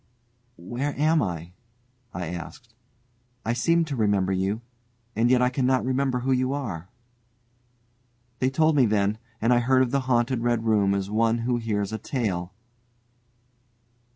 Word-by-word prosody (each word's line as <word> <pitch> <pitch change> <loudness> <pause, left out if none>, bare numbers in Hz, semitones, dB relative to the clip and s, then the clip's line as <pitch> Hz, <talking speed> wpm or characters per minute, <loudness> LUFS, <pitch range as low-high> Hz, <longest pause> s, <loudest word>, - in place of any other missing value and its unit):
"Where 125 +11 -4
am 155 +1 +3
I?" 85 -4 -4 0.6
I 90 - -4
asked; 115 - -8 0.7
"I 115 - +1
seem 165 +7 +2
to 145 -3 -4
remember 100 -4 +1
you, 95 +4 -1 0.5
and 115 +2 +2
yet 125 0 +4
I 125 - +2
cannot 130 -1 +1
remember 130 -1 0
who 135 +2 0
you 130 +1 +1
are." 95 - -5 1.5
They 130 - +2
told 155 +3 +2
me 130 -5 +5
then, 105 0 +1 0.2
and 115 +3 +3
I 120 - +4
heard 130 +2 +3
of 125 - -2
the 140 - +2
haunted 120 0 +2
Red 120 -1 0
Room 100 -3 +3
as 100 0 -3
one 115 +1 +2
who 125 -1 +1
hears 105 -3 -2
a 110 - -3
tale. 100 -8 -2
120 Hz, 155 wpm, -25 LUFS, 100-130 Hz, 1.5 s, me